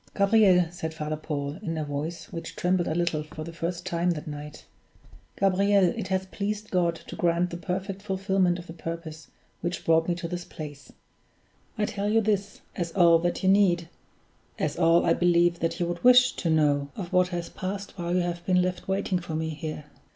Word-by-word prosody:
"Gabriel," 200 Hz, -3 st, +5 dB
said 160 Hz, -2 st, -5 dB
Father 155 Hz, -1 st, -3 dB
Paul, 150 Hz, 0 st, -4 dB
in 165 Hz, -6 st, -3 dB
a 155 Hz, -, -2 dB
voice 150 Hz, +6 st, -5 dB
which 165 Hz, -, -6 dB
trembled 180 Hz, -1 st, +1 dB
a 155 Hz, -, -1 dB
little 170 Hz, -3 st, 0 dB
for 155 Hz, +1 st, -8 dB
the 170 Hz, +1 st, -8 dB
first 170 Hz, +1 st, -4 dB
time 175 Hz, -1 st, 0 dB
that 160 Hz, -4 st, -2 dB
night 150 Hz, 0 st, -8 dB, 0.7 s
"Gabriel, 195 Hz, -1 st, +3 dB
it 225 Hz, -, -4 dB
has 190 Hz, 0 st, 0 dB
pleased 210 Hz, +2 st, -4 dB
God 175 Hz, -2 st, +2 dB
to -, -, -10 dB
grant 175 Hz, +1 st, +1 dB
the 170 Hz, -, -4 dB
perfect 190 Hz, +3 st, -4 dB
fulfillment 190 Hz, -2 st, +1 dB
of 175 Hz, -, -9 dB
the 165 Hz, -, -9 dB
purpose 165 Hz, -2 st, -7 dB, 0.3 s
which 175 Hz, +1 st, -3 dB
brought 165 Hz, 0 st, +3 dB
me 175 Hz, -, +1 dB
to 170 Hz, 0 st, -5 dB
this 175 Hz, 0 st, -4 dB
place; 145 Hz, -4 st, -9 dB, 0.9 s
I 210 Hz, -, +1 dB
tell 205 Hz, 0 st, -2 dB
you 225 Hz, +1 st, +4 dB
this, 205 Hz, -2 st, -1 dB
as 170 Hz, -2 st, -3 dB
all 170 Hz, -3 st, +6 dB
that 175 Hz, +3 st, -2 dB
you 190 Hz, -, +4 dB
need 180 Hz, -4 st, +3 dB, 0.7 s
as 155 Hz, -, -1 dB
all, 165 Hz, 0 st, +4 dB
I -, -, +4 dB
believe, 175 Hz, -1 st, +3 dB
that 165 Hz, -, -1 dB
you 175 Hz, -, +1 dB
would 175 Hz, 0 st, -4 dB
wish 250 Hz, 0 st, +7 dB
to 170 Hz, -, -3 dB
know 145 Hz, -3 st, +2 dB
of 175 Hz, -4 st, -6 dB
what 180 Hz, 0 st, +4 dB
has 175 Hz, -2 st, -4 dB
passed 195 Hz, +2 st, -5 dB
while 175 Hz, -1 st, -2 dB
you 180 Hz, -, +3 dB
have 175 Hz, 0 st, -3 dB
been 180 Hz, -1 st, +4 dB
left 180 Hz, 0 st, -1 dB
waiting 190 Hz, -1 st, 0 dB
for 170 Hz, -2 st, -6 dB
me 160 Hz, 0 st, -1 dB
here. 155 Hz, 0 st, -5 dB
175 Hz, 200 wpm, -27 LUFS, 165-190 Hz, 0.9 s, wish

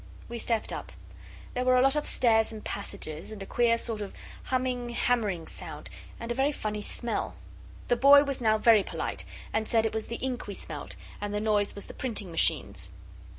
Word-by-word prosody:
We 235 Hz, 0 st, -5 dB
stepped 230 Hz, -1 st, -1 dB
up. -, -, -6 dB, 0.6 s
There 250 Hz, -, 0 dB
were 255 Hz, 0 st, +5 dB
a -, -, +6 dB
lot 270 Hz, +2 st, +4 dB
of 300 Hz, -, 0 dB
stairs 225 Hz, -3 st, +3 dB
and 215 Hz, -1 st, -8 dB
passages, 175 Hz, -4 st, -5 dB
and 205 Hz, -2 st, -6 dB
a -, -, -7 dB
queer 235 Hz, +2 st, +3 dB
sort 225 Hz, -2 st, -3 dB
of 200 Hz, -, -6 dB, 0.3 s
humming, 255 Hz, -2 st, -1 dB
hammering 225 Hz, -8 st, +1 dB
sound -, -, -8 dB, 0.3 s
and 230 Hz, 0 st, -4 dB
a -, -, +2 dB
very 270 Hz, +4 st, +2 dB
funny 210 Hz, -6 st, -3 dB
smell. 235 Hz, +2 st, -2 dB, 0.5 s
The 245 Hz, -, +4 dB
boy 280 Hz, +3 st, +8 dB
was 275 Hz, -3 st, -3 dB
now 220 Hz, -2 st, +4 dB
very 220 Hz, -1 st, +6 dB
polite, -, -, -4 dB, 0.3 s
and 220 Hz, 0 st, 0 dB
said 225 Hz, -1 st, +3 dB
it 225 Hz, -, 0 dB
was 220 Hz, -1 st, -2 dB
the 235 Hz, -, -4 dB
ink 255 Hz, -2 st, -3 dB
we 200 Hz, -, -5 dB
smelt, -, -, -6 dB, 0.3 s
and 205 Hz, 0 st, -2 dB
the -, -, +1 dB
noise 210 Hz, -1 st, +2 dB
was 200 Hz, -, -5 dB
the -, -, -10 dB
printing 215 Hz, -8 st, -4 dB
machines. 165 Hz, -, +1 dB
230 Hz, 200 wpm, -29 LUFS, 210-245 Hz, 0.6 s, boy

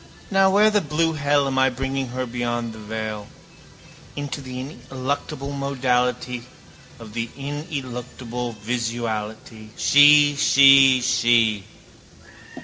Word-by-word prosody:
Now 195 Hz, 0 st, +4 dB
where 210 Hz, +3 st, +4 dB
the 210 Hz, -1 st, +2 dB
blue 165 Hz, +1 st, -1 dB
hell 145 Hz, -1 st, +1 dB
am 135 Hz, -1 st, -1 dB
I 130 Hz, 0 st, +4 dB
bringing 135 Hz, +1 st, -3 dB
her 130 Hz, +1 st, -4 dB
beyond 120 Hz, -1 st, -3 dB
the 110 Hz, -, -11 dB
veil? 110 Hz, -1 st, -6 dB, 0.9 s
Into 145 Hz, 0 st, -5 dB
the 130 Hz, -1 st, -8 dB
ineluctable 135 Hz, +1 st, -5 dB
modality 125 Hz, -3 st, -2 dB, 0.5 s
of 110 Hz, -2 st, -12 dB
the 115 Hz, 0 st, -3 dB
ineluctable 125 Hz, -5 st, -6 dB
visuality. 110 Hz, -1 st, -5 dB
She, 145 Hz, 0 st, +6 dB
she, 135 Hz, -2 st, +6 dB
she. 115 Hz, -4 st, +2 dB
130 Hz, 110 wpm, -22 LUFS, 120-140 Hz, 0.9 s, She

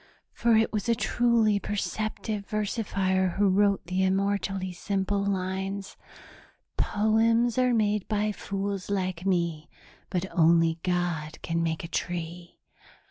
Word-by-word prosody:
For 235 Hz, -1 st, +3 dB
it 220 Hz, +1 st, +2 dB
was 215 Hz, +2 st, -1 dB
a 230 Hz, -, +4 dB
truly 230 Hz, -3 st, +2 dB
perceptive 210 Hz, 0 st, -3 dB
versifier 195 Hz, -3 st, 0 dB
who 205 Hz, 0 st, +3 dB
wrote 200 Hz, +1 st, +2 dB
the 185 Hz, +2 st, 0 dB
immortally 195 Hz, 0 st, 0 dB
simple 200 Hz, +2 st, -1 dB
lines: 195 Hz, 0 st, -3 dB, 0.8 s
'Poems 225 Hz, +3 st, +2 dB
are 250 Hz, 0 st, +3 dB
made 210 Hz, -2 st, +1 dB
by 210 Hz, 0 st, 0 dB
fools 200 Hz, -1 st, -4 dB
like 185 Hz, -2 st, -2 dB
me, 170 Hz, -5 st, 0 dB, 0.4 s
but 185 Hz, -1 st, -1 dB
only 165 Hz, -1 st, +4 dB
God 175 Hz, -4 st, -2 dB
can 165 Hz, 0 st, -1 dB
make 165 Hz, 0 st, -1 dB
a -, -, -5 dB
tree.' 175 Hz, 0 st, -4 dB
195 Hz, 125 wpm, -27 LUFS, 180-210 Hz, 0.8 s, a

